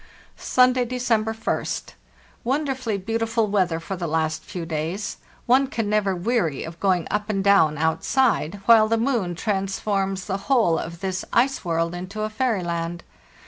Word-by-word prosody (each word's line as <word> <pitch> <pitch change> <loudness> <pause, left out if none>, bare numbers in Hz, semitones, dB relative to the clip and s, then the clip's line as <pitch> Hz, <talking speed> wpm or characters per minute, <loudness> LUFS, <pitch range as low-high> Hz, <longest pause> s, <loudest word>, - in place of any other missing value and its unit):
"Sunday, 255 0 +3
December 235 -3 0
1st. 225 0 -3 0.5
Wonderfully 260 -4 -1
beautiful 225 +3 0
weather 185 -5 +1
for 180 +4 -5
the 175 -2 -4
last 155 0 -1
few 175 -2 -6
days; 165 +6 -3 0.3
one 265 +3 +4
can 225 -6 -2
never 200 -3 +2
weary 175 - 0
of 165 +1 -9
going 185 -4 +1
up 210 +1 -1
and 195 -2 0
down 190 -7 +4
outside, 195 - +1
while 225 -2 +7
the 230 +1 +1
moon 225 -8 0
trans 195 +1 -1
forms 195 -2 -1
the 195 -2 -2
whole 225 -12 +3
of 170 0 -7
this 190 -1 -2
ice 265 +3 +2
world 165 -1 0
into 185 +4 -6
a 215 - -2
fairy 225 -4 0
land. 170 0 -3
200 Hz, 160 wpm, -23 LUFS, 170-230 Hz, 0.5 s, while